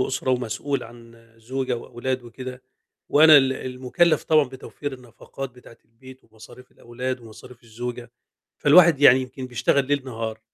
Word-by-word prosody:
أسرة 130 0 -1
ومسؤول 130 +2 -2
عن 115 0 -15
زوجة 130 +2 -3
وأولاد 125 +2 -4
وكده، 125 +1 -9 0.5
وأنا 155 +1 +8
ال 135 -2 +4
المُكلَّف 130 +7 0
طبعًا 155 -2 +4
بتوفير 135 +2 -8
النفقات 130 +1 -9
بتاعة 125 -2 -17
البيت 130 +3 -17
ومصاريف 110 +3 -16
الأولاد 125 +2 -6
ومصاريف 115 +1 -14
الزوجة، 120 +1 -7 0.5
فالواحد 160 -1 +6
يعني 130 -2 +7
يمكن 130 0 -8
بيشتغل 130 +2 0
ليل 140 -1 -1
نهار، 110 -3 -6
130 Hz, 135 wpm, -23 LUFS, 120-135 Hz, 0.5 s, وأنا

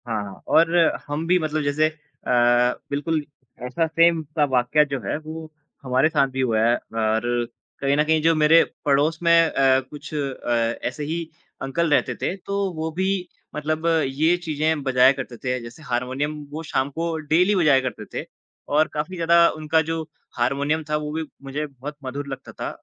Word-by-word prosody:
हाँ, 105 -4 -4
और 165 +1 +4 0.3
हम 145 +2 -3
भी 180 +1 +4
मतलब 155 -1 -1
जैसे 145 +2 +2
अ, - - -16 1.0
बिल्कुल 150 +2 -1 0.4
ऐसा 165 +6 0
सेम 165 0 +3
सा 150 +1 -1
वाकया 130 +4 +3
जो 135 - -1
है 95 - -2
वो 155 +1 -8 0.3
हमारे 130 +3 +2
साथ 140 -3 +2
भी 130 - -1
हुआ 115 -4 +1
है 115 +2 +4
और 110 -1 -1 0.6
कहीं 140 0 +2
न 150 - +4
कहीं 160 0 +2
जो 165 +1 +4
मेरे 155 +2 +6 0.2
पड़ोस 150 +3 +2
में 170 - +4 0.2
अ, 135 -1 +3
कुछ 145 +3 -10
अ, - - -2 0.7
ऐसे 130 +4 -5
ही 160 +3 -2 0.4
अंकल 165 +5 0
रहते - - +1
थे, 185 - -2
तो 200 0 -3
वो 160 0 -3
भी 185 +4 -1 0.5
मतलब 155 +2 -2 0.2
ये 155 +6 +2
चीज़े 155 -1 0 0.2
बजाया 130 0 +6
करते 130 -3 -6
थे, 125 +1 -2
जैसे 115 +7 -11
हारमोनियम 130 +3 -2 0.2
वो 155 +2 -5
शाम 135 -3 -1
को 165 +3 -3 0.2
डेली 180 +5 +4
बजाया 150 -7 +4
करते 110 -3 -6
थे। - - -4 0.5
और 155 +2 +4
काफ़ी 155 +5 -3
ज़्यादा 170 0 +5
उनका 155 +1 +1
जो 165 +1 -3 0.4
हार्मोनियम 140 +6 0
था 150 - +1
वो 150 0 -4
भी 160 +1 -2 0.2
मुझे 140 +3 -3
बहुत 140 +2 -9
मधुर 140 +2 -5
लगता 135 -1 -7
था - - -5
150 Hz, 180 wpm, -23 LUFS, 135-160 Hz, 1.0 s, मेरे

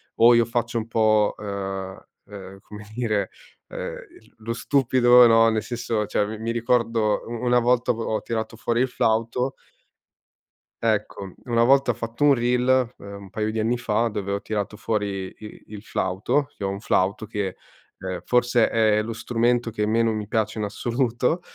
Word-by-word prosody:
o 120 +1 +6
io 115 0 +5
faccio 120 0 -2
un 110 - -3
po', 110 -2 +2
uhm 95 -2 -5 0.2
uhm, 95 -1 -11
come 105 +1 -12
dire, 110 -5 -1 0.4
uhm, - - -10
l - - -9
lo 115 +1 -2
stupido, 125 0 +5
no, 115 -1 +6
nel 110 -1 -1
senso 115 -3 -2
cioè 105 0 0
mi 110 +1 -6
mi 115 +2 -3
ricordo 115 -2 +1
u 115 - -9
una 125 0 +4
volta 120 +1 +2
ho 115 -1 -2
tirato 115 -1 -4
fuori 120 +2 0
il 130 - +1
flauto 115 +3 0 1.3
Ecco, 100 -4 -2
una 115 -2 +2
volta 135 0 +4
ho - - -4
fatto 115 +4 -4
un 145 -1 +6
reel, 125 0 +2
ehm, 100 0 -10
un 95 - -12
paio 110 +2 -2
di 110 - -3
anni 115 +3 +1
fa, 115 0 0
dove 105 -3 -4
ho 100 - -2
tirato 105 -1 -4
fuori 100 -4 -3
i 105 -1 -12
il 105 -1 -10
flauto, 100 +10 -1
che - - -8
ho 95 - 0
un 100 0 -4
flauto 100 0 0
che, 100 -3 -4 0.4
ehm, 95 -1 -5
forse 120 -1 +2
è 110 -2 +3
lo 115 - -5
strumento 120 +1 0
che 105 -1 -1
meno 115 +1 +2
mi 105 -1 -3
piace 110 0 -1
in 105 - -2
assoluto 120 - -1
115 Hz, 180 wpm, -24 LUFS, 105-120 Hz, 1.3 s, o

